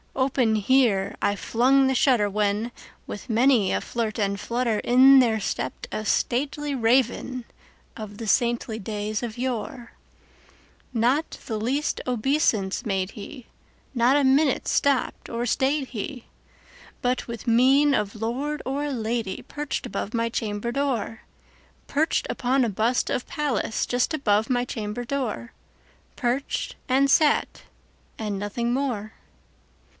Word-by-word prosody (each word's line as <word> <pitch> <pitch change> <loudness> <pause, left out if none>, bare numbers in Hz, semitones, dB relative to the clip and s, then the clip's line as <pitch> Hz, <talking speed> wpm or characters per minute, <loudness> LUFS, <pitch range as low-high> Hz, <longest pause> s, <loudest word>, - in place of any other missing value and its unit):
Open 260 -4 +2
here 215 -3 +2
I 205 - +1
flung 265 +6 +3
the 265 - +1
shutter, 240 -6 +3
when, 210 +3 0 0.3
with 205 - -8
many 230 -3 +3
a - - +1
flirt 225 -3 -3
and 200 -1 0
flutter, 235 0 -1
In 265 +2 +7
there 225 -4 +3
stepped 355 - -4
a 215 - -3
stately 285 +7 0
Raven 250 +1 +1 0.5
of 210 -2 -8
the 225 - -6
saintly 235 -1 +1
days 210 +1 -3
of 230 -1 -5
yore. 245 -1 -4 1.0
Not 250 +7 +1
the 220 - -3
least 270 +7 -1
obeisance 240 -5 +1
made 195 -2 -1
he; 240 +4 -10 0.5
not 245 +2 +3
a 290 - +3
minute 275 +1 +3
stopped 280 -2 0
or 235 +1 -2
stayed 270 +3 0
he; 250 +2 -6 0.8
But, 250 0 0
with 235 -1 -7
mien 265 +5 +5
of 210 -4 -1
lord 270 +7 -2
or 285 +3 -2
lady, 225 -4 -2
perched 295 -2 -4
above 225 -3 -4
my 230 0 +1
chamber 220 0 -3
door, 240 -5 -2 0.7
Perched 310 +3 +1
upon 260 +1 +1
a - - 0
bust 220 +5 0
of 250 - -2
Pallas 275 -7 -1
just 245 +6 0
above 215 -6 +1
my 245 -1 +1
chamber 220 0 -4
door:Perched, 250 0 -4
and 270 +2 +3
sat, 300 +1 +3 0.6
and 210 -3 -3
nothing 235 +4 -2
more. 240 -6 -2
240 Hz, 130 wpm, -25 LUFS, 215-270 Hz, 1.0 s, In